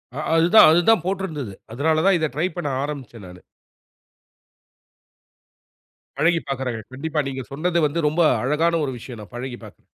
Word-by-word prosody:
ஆ - - -7 0.2
அதுதான் 170 +7 +7
அதுதான் 175 +3 +4
போட்ருந்தது. 165 - -3 0.2
அதனால 155 +6 +1
தான் 195 -2 +5
இத 155 - 0
ட்ரை 170 +4 +1
பண்ண 175 - -3 0.2
ஆரம்பிச்சேன் 130 -8 -7
நானு. 90 0 -13 2.8
பழகிப் 165 -1 +1
பாக்குறேங்க. 125 -4 -3
கண்டிப்பா 155 +3 -3
நீங்க 130 -1 -5
சொன்னது 170 +5 0
வந்து 165 +4 -3
ரொம்ப 160 +3 +1 0.2
அழகான 165 +5 +1
ஒரு 130 - -4
விஷயம், 120 -1 -10
நான் 105 - -14
பழகிப் 125 0 -7
பாக்குறேன். - - -16
150 Hz, 145 wpm, -22 LUFS, 130-170 Hz, 2.8 s, அதுதான்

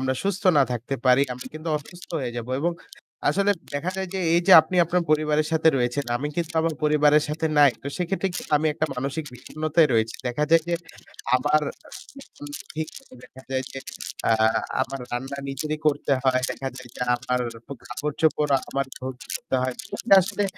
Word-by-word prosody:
আমরা 130 0 0
সুস্থ 200 0 -1 0.2
না - - +7
থাকতে 120 +3 -3
পারি 125 +2 +6
আমরা 125 +1 -8
কিন্তু 155 +1 -6
অসুস্থ 175 +4 -10
হয়ে 120 -2 -3
যাবো। 120 +1 -5
এবং 170 +3 +1 0.6
আসলে 200 +6 +2 0.2
দেখা 165 +6 -1
যায় 190 -1 -3
যে - - -1 0.2
এইযে 175 +2 +4
আপনি 160 +4 -4
আপনার 175 +1 +1
পরিবারের 155 0 +2
সাথে 160 0 +4
রয়েছেন 125 +3 0
আমি 145 +4 -3
কিন্তু 170 0 -2
আমার 165 0 0
পরিবারের 150 0 +4
সাথে 160 +2 -1
নাই, 145 -2 +8
তো - - -7
সেক্ষেত্রে 190 +2 -1
কি - - -2 0.2
আমি 155 +2 0
একটা 155 +1 -1
মানসিক 140 +5 -3
বিষণ্ণতায় 155 +5 +1
রয়েছি। 110 0 +1
দেখা 125 +5 0
যায় 165 0 +6
যে 170 - +1 0.6
আমার 150 +4 +2 1.1
ভি 160 - -1 0.4
দেখা 130 +1 -14
যায় 130 0 0
যে - - -5 0.5
আ - - +6 0.5
আমার 135 0 -5
রান্না 135 +3 -4
নিজেরই 150 +3 -3
করতে 145 -1 +1
হয়। 130 -1 +3
দেখা 135 - -4
যায় 130 -1 -10
যে - - -10
আমার 125 +1 -1 0.5
কাপড়-চোপড় 150 +3 0 0.2
আমার 140 0 -1
ধুতে 130 0 -4
হয়। 130 -1 -1 0.5
আসলে 200 +3 -1
150 Hz, 170 wpm, -24 LUFS, 130-160 Hz, 1.1 s, নাই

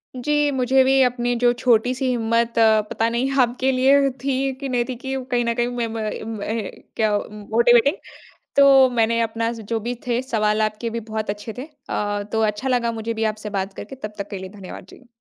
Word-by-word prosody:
जी, 295 +3 +1
मुझे 265 0 +3
भी 270 +1 +4
अपनी 245 -1 0
जो 245 0 +4
छोटी-सी 250 +2 +2
हिम्मत 230 -1 0
अ, 220 -1 +5
पता 225 - 0
नहीं 250 +3 -1
आपके 255 +2 +1
लिए 275 +2 +4
थी 270 0 0
कि 275 -2 -4
नहीं 240 -1 0
थी 255 - -3
कि 265 0 -3 0.2
कहीं 240 -1 +1
न 235 - +1
कहीं 240 0 0
में 240 -1 -2
म - - -7
मैं 220 -1 -4
मैं 215 0 -3 0.2
क्या 215 -2 +2
मोटिवेटिंग। 235 +5 +3 0.6
तो 275 -2 +7
मैंने 230 -1 +1
अपना 230 0 -1
जो 225 0 -4
भी 240 +3 -4
थे 240 +1 +1
सवाल 215 -4 0
आपके 215 +2 -1
भी 230 +1 -4
बहुत 220 -1 -5
अच्छे 210 +2 -5
थे। 255 - -4 0.3
अ, 205 0 -2
तो 225 - 0
अच्छा 215 +4 -1
लगा 240 -2 +1
मुझे 225 0 -4
भी 225 0 -2
आपसे 215 0 -8
बात 195 -1 -3
करके। 270 - -9
तब 215 -5 -7
तक 200 0 -5
के 200 - -5
लिए 185 0 -8
धन्यवाद 185 - -9
जी। 250 - -17
235 Hz, 210 wpm, -22 LUFS, 220-255 Hz, 0.6 s, तो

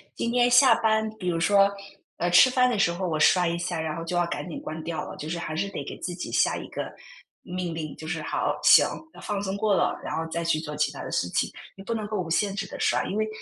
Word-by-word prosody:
今 235 - -2
天 245 0 +3
下 255 +2 +7
班， 220 -1 +1
比 180 - -4
如 170 -2 0
说， 200 +3 +4 0.5
呃， 175 - 0
吃 180 +9 +8
饭 250 0 +3
的 235 -4 -1
时 170 - +3
候 180 +2 -3
我 155 -3 -1
刷 180 +2 +4
一 170 - -1
下， 170 -1 -3
然 160 -1 -3
后 165 - -5
就 170 +2 -3
要 175 - +3
赶 145 0 -4
紧 - - -6
关 160 +1 -6
掉 165 0 -3
了。 - - -8
就 155 - -6
是 170 - -2
还 155 -2 -4
是 195 - -1
得 - - -5
给 - - -8
自 175 - -4
己 180 - -6
下 - - +2
一 - - -7
个 - - -5 0.5
命 180 -2 -4
令， 155 -2 -5
就 155 - -9
是 160 -2 -3
好， - - -1
行， - - +7 0.3
放 205 -2 -3
松 190 -1 -2
过 205 0 +2
了， - - 0
然 - - -4
后 160 - -2
再 170 +1 -2
去 165 -2 +1
做 150 -1 -6
其 150 -1 +1
它 145 - -8
的 - - -6
事 - - 0
情， - - 0 0.3
你 195 - -10
不 230 - -3
能 215 -2 -3
够 210 -1 -3
无 180 - -3
限 195 +4 0
制 195 -1 -3
地 - - -9
刷。 - - +2
因 200 - -3
为 215 0 +1
175 Hz, 305 characters per minute, -26 LUFS, 165-205 Hz, 0.5 s, 吃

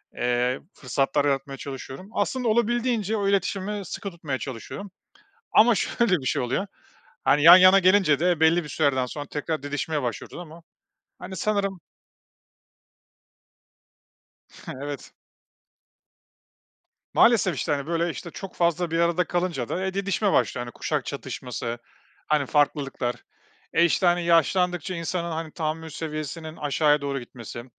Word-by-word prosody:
eee, 125 +1 0
fırsatlar 140 +2 0
yaratmaya 135 -1 -1
çalışıyorum. 135 +7 -8
Aslında 255 -2 -1
olabildiğince 230 -1 +1
o 200 -1 0
iletişimi 200 +1 -1
sıkı 200 +2 -6
tutmaya 155 -6 -4
çalışıyorum. 140 - -7 0.6
Ama 230 +1 +6
şöyle 195 0 +1
bir 130 - -8
şey - - +1
oluyor, 135 +11 -1 0.6
hani, 145 +2 +3
yan 175 +3 +11
yana 185 +1 +7
gelince 185 -6 +4
de 175 -2 +2
belli 160 +2 +4
bir 150 - -9
sürelerden 135 -4 +1
sonra 145 +3 -6
tekrar 155 0 -3
didişmeye 145 +1 -2
başlıyoruz 120 - -5
ama 165 -1 -11 0.6
hani 190 - -7
sanırım 195 -2 -1 2.9
Evet. 140 +1 -7 2.0
Maalesef, 210 -7 +4
işte, 155 - -2
hani, 140 +1 -1
böyle, 170 0 0
işte, 170 +1 -7
çok 195 -2 -8
fazla 170 0 +1
bir 165 - 0
arada 170 +1 +2
kalınca 175 -9 -2
da 185 +2 -2
e, 190 - -2
didişme 200 +1 0
başlıyor 120 -1 0
kuşak - - -2
çatışması, 120 -1 -5 0.5
hani, 150 -2 +2
farklılıklar. 140 -4 0 0.6
E, 170 - +5
işte, 180 +2 +1
hani, 175 0 +3
yaşlandıkça 180 +1 +2
insanın, 170 +1 -3
hani, 160 -1 -4
tahammül 160 0 -3
seviyesinin 155 +1 -5
aşağıya 150 0 +2
doğru 140 -1 -2
gitmesi. 120 -1 -9
165 Hz, 130 wpm, -25 LUFS, 140-185 Hz, 2.9 s, yan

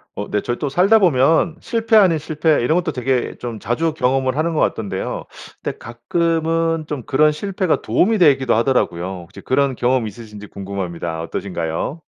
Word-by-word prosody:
어 100 - -5
네 105 - 0
저희 120 +3 -3
또 145 - -2
살다 190 +10 +4
보면 160 0 +3
실패 225 -1 0
아닌 185 -6 +6
실패 155 -1 +1
이런 125 +7 +1
것도 175 -2 0
되게 130 -2 -1
좀 115 -3 -6
자주 155 +10 -1
경험을 130 -2 0
하는 160 +3 0
것 155 - -1
같던데요. 100 -4 -2 0.4
근데 - - -4
가끔은 165 +6 -1
좀 145 -5 -4
그런 150 +3 +3
실패가 185 +2 -1
도움이 220 +5 +2
되기도 140 - +4
하더라고요. 115 -8 +1 0.2
혹시 85 - -14
그런 135 0 0
경험이 125 -2 +1
있으신지 105 -1 -11
궁금합니다. 90 -5 -5
어떠신가요? 85 - -4
135 Hz, 380 characters per minute, -19 LUFS, 115-165 Hz, 0.4 s, 아닌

